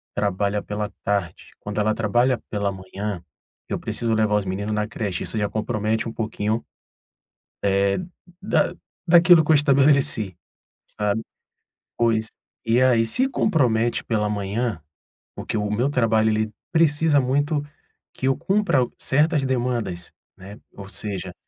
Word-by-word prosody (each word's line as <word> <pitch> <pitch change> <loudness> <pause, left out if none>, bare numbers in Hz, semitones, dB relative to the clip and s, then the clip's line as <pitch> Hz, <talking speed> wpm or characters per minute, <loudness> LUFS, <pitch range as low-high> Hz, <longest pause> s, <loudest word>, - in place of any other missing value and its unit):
trabalha 100 0 0
pela 105 0 -4
tarde. 100 -5 -2
Quando 105 +1 -5
ela 110 +1 +2
trabalha 120 +3 +1
pela 100 -2 -1
manhã, 95 0 -6 0.5
eu - - -2
preciso 115 -1 -2
levar 110 -1 +2
os 105 -2 0
meninos 100 +3 -3
na 105 0 -1
creche, 100 -6 -4
isso 110 - -5
já 105 - +1
compromete 110 +1 -1
um - - -8
pouquinho, 110 0 -2 1.6
eh, 180 - -19
da 175 -3 +1 0.3
daquilo 175 -1 +7
que 160 - +1
eu - - +7
estabeleci, 135 - +3 0.6
sabe? 105 +1 0 0.8
Pois, 110 -2 +1 0.3
e 115 +2 +2
aí, 120 -3 +4
se 260 - +2
compromete 125 - +1
pela 105 -2 0
manhã, 105 0 -2 0.6
porque 125 - -5
o 105 0 -1
meu 120 +6 +1
trabalho 110 -5 +2
ele 110 0 0 0.2
precisa 160 -2 +4
muito 145 +4 0 0.5
que 130 - -3
eu 135 - +3
cumpra 195 -8 +1 0.2
certas 150 0 +2
demandas, 120 -9 -2 0.3
né, 100 +3 -11
ou 100 -1 -10
seja, 95 -3 -4
110 Hz, 135 wpm, -23 LUFS, 105-130 Hz, 1.6 s, daquilo